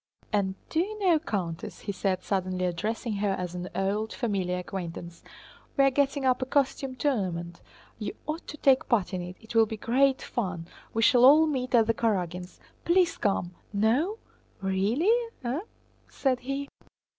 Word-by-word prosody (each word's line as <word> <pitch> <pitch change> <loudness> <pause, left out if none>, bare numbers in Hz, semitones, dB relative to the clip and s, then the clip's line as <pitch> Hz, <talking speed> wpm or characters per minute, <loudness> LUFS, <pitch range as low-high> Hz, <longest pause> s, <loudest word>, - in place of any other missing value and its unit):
"And 195 -2 +1
do 320 - 0
you 420 +5 -1
know, 365 -6 +3
Countess," 180 - -4
he - - -3
said, 185 -1 -1
suddenly 185 -2 -1
addressing 210 +5 -2
her 200 -1 +1
as 180 -2 -4
an 180 0 -5
old, 205 +3 -1
familiar 195 -7 -1
acquaintance, 175 -2 -6 0.6
"we 275 - +6
are 275 - +5
getting 280 0 +1
up 255 0 +3
a - - +1
costume 270 -1 0
tournament; 185 - -2 0.4
you 210 - -4
ought 310 +3 -4
to 300 - -7
take 270 -2 +3
part 210 -5 +2
in 185 - -1
it! 180 +1 -7
It 225 +1 -11
will 225 -1 +5
be 220 - -5
great 265 +5 +3
fun. 185 -8 -3 0.3
We 225 - 0
shall 245 +1 +6
all 300 +5 +8
meet 260 -5 0
at 230 -2 +6
the 230 - +2
Karágins'! 180 -6 -2 0.2
Please 345 -1 +3
come! 180 -3 -1 0.2
No! 245 - +2 0.4
Really, 205 - +2 0.3
eh?" 255 +6 -1 0.5
said 260 -2 0
he. 275 +2 -3
220 Hz, 170 wpm, -28 LUFS, 185-270 Hz, 0.6 s, all